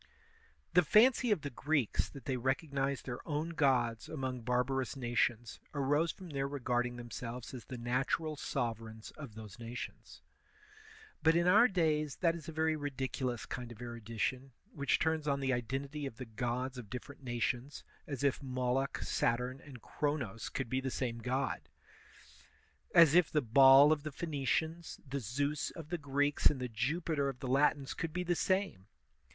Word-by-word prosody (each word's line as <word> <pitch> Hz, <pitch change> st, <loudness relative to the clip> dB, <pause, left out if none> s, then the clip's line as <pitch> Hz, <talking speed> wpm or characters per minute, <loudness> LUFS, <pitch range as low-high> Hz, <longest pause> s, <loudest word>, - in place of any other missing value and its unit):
The 180 Hz, -, +7 dB
fancy 235 Hz, -, +5 dB
of 205 Hz, -7 st, +2 dB
the 145 Hz, -, -5 dB
Greeks 145 Hz, -2 st, 0 dB
that 140 Hz, -4 st, -11 dB
they 130 Hz, -, 0 dB
recognized 135 Hz, 0 st, -1 dB
their 125 Hz, -2 st, -4 dB
own 155 Hz, +1 st, -2 dB
gods 125 Hz, -8 st, +1 dB
among 130 Hz, -4 st, -3 dB
barbarous 125 Hz, +3 st, 0 dB
nations 120 Hz, -2 st, 0 dB, 0.2 s
arose 145 Hz, +4 st, +2 dB
from 185 Hz, -4 st, -11 dB
their 135 Hz, -1 st, -1 dB
re 140 Hz, 0 st, -5 dB
garding 120 Hz, -1 st, 0 dB
themselves 120 Hz, 0 st, -6 dB
as 125 Hz, -3 st, -8 dB
the 130 Hz, -, -7 dB
natural 135 Hz, +6 st, -1 dB
sovereigns 115 Hz, -6 st, -4 dB
of 140 Hz, -8 st, -10 dB
those 110 Hz, +1 st, -10 dB
nations. 120 Hz, +1 st, -8 dB, 1.0 s
But 160 Hz, 0 st, +4 dB
in 170 Hz, 0 st, +3 dB
our 215 Hz, +7 st, +7 dB
days 155 Hz, -, +1 dB
that 170 Hz, -2 st, +2 dB
is 165 Hz, -2 st, -8 dB
a -, -, -4 dB
very 160 Hz, 0 st, +1 dB
ridiculous 130 Hz, -4 st, -3 dB
kind 120 Hz, -1 st, -6 dB
of 115 Hz, -, -11 dB
erudition 120 Hz, +2 st, -3 dB, 0.2 s
which 140 Hz, -1 st, +1 dB
turns 160 Hz, -1 st, 0 dB
on 140 Hz, -1 st, +1 dB
the 135 Hz, -1 st, +1 dB
identity 135 Hz, +4 st, -3 dB
of 115 Hz, -, -9 dB
the 130 Hz, -, -6 dB
gods 125 Hz, +3 st, -3 dB
of 110 Hz, -5 st, -10 dB
different 125 Hz, +5 st, -8 dB
nations, 120 Hz, +2 st, -2 dB, 0.2 s
as 140 Hz, -2 st, -4 dB
if 140 Hz, -1 st, +2 dB
Moloch, 130 Hz, +1 st, -1 dB
Saturn, 125 Hz, +3 st, 0 dB
and 130 Hz, -6 st, -12 dB
Chronos 140 Hz, -8 st, -2 dB
could 130 Hz, -, -3 dB
be 130 Hz, +3 st, -1 dB
the 130 Hz, -, -2 dB
same 120 Hz, -2 st, -2 dB
god! 130 Hz, +3 st, -2 dB, 1.3 s
As 165 Hz, -3 st, +8 dB
if 175 Hz, -2 st, +5 dB
the 150 Hz, -2 st, +1 dB
Baal 135 Hz, +4 st, +8 dB
of 155 Hz, -2 st, +2 dB
the 155 Hz, +1 st, -5 dB
Phoenicians, 160 Hz, +2 st, -2 dB
the 140 Hz, +1 st, -2 dB
2^us 140 Hz, +6 st, -1 dB
of 165 Hz, -3 st, -9 dB
the 175 Hz, 0 st, -2 dB
Greeks, 145 Hz, 0 st, +2 dB
and 140 Hz, -, 0 dB
the 125 Hz, -1 st, -3 dB
Jupiter 140 Hz, +5 st, 0 dB
of 135 Hz, -, -6 dB
the 130 Hz, -, -5 dB
Latins 140 Hz, +1 st, +2 dB
could 165 Hz, -2 st, -4 dB
be 180 Hz, +1 st, -1 dB
the 175 Hz, 0 st, +1 dB
same! 185 Hz, -, 0 dB
135 Hz, 170 wpm, -34 LUFS, 125-150 Hz, 1.3 s, As